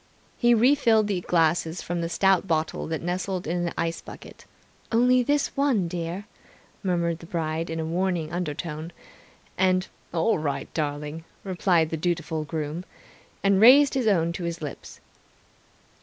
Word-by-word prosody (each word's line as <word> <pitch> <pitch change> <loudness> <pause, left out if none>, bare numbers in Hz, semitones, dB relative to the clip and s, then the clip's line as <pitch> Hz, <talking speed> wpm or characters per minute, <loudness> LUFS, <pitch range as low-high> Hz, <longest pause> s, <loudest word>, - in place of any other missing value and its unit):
He 240 -1 +4
refilled 230 -3 +4
the 200 -3 -1
glasses 165 0 +1
from 175 0 -3
the 165 - -2
stout 195 +1 +2
bottle 160 -1 -1
that 160 0 -3
nestled 180 +1 -2
in 175 +2 -1
the 170 - -4
ice 165 0 -1
bucket - - -12 0.5
("Only 250 +2 +4
this 290 +3 0
one, 265 -10 +2
dear!" 175 +3 -4 0.6
murmured 170 -3 0
the 165 - -12
bride 165 -1 -2
in 165 0 -3
a 160 - -2
warning 170 -1 -1
undertone, 165 -1 -4 0.7
and 185 0 +2 0.2
"All 170 +3 +1
right 145 -2 -3
darling!" 150 +1 -3 0.2
replied 175 -4 +1
the 160 - -1
dutiful 160 -1 -2
groom) 155 +2 -4 0.6
and 200 0 +3
raised 270 +5 +8
his 260 -4 0
own 170 -5 +2
to 175 0 -5
his 170 0 -3
lips. 150 -3 -8
175 Hz, 150 wpm, -25 LUFS, 160-195 Hz, 0.7 s, raised